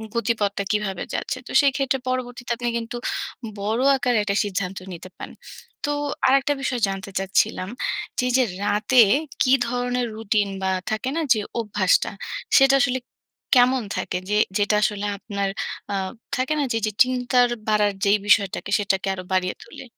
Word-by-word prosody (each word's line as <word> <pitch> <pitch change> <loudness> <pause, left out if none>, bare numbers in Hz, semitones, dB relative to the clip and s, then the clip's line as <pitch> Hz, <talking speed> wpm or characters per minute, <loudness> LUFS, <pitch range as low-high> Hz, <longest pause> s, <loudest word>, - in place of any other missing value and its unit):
গতিপথটা 210 -3 0
কীভাবে 210 -4 -1
যাচ্ছে। 265 - -2
তো - - -8
সেই 280 -1 +4
ক্ষেত্রে 270 -1 0
পরবর্তীতে 250 -1 -3
আপনি 240 +1 -2
কিন্তু 230 +1 -5 0.6
বড় 215 +4 -1
আকারে 250 -2 +1
একটা 200 -1 -1
সিদ্ধান্ত 195 -2 -3 0.2
নিতে 175 +2 -9
পারেন। - - -8 0.5
তো 290 - -1 0.4
আরেকটা 275 +2 +3
বিষয় 255 -3 -2
জানতে 195 0 -5
চাচ্ছিলাম 190 -1 0 0.5
যে, 250 - +1
যে, 260 - +4 0.2
রাতে 210 +5 +4 0.4
কী 255 - +4
ধরনের 245 0 -1
রুটিন 210 -2 0
বা 190 - +1 0.2
থাকে 215 +4 -1
না 330 - 0
যে 220 - -2 0.2
অভ্যাসটা 205 -4 +1 0.5
সেটা 270 0 +6
আসলে 260 -2 +1 0.6
কেমন 250 +1 +5 0.2
থাকে? 180 - -2
যে 210 - +2 0.2
যেটা 205 0 +2
আসলে 210 -1 0
আপনার 200 -1 -3 0.4
আ - - 0 0.4
থাকে 265 +3 0
না - - +2
যে 225 - +1 0.2
চিন্তা 250 0 -1 0.3
বাড়ার 210 -1 +3
যেই 200 +1 +5
বিষয়টাকে 200 -2 +2
সেটাকে 195 -2 -1
আরো 185 -1 -6
বাড়িয়ে 185 -1 +1
তোলে? - - -11
220 Hz, 155 wpm, -23 LUFS, 200-250 Hz, 0.6 s, সেটা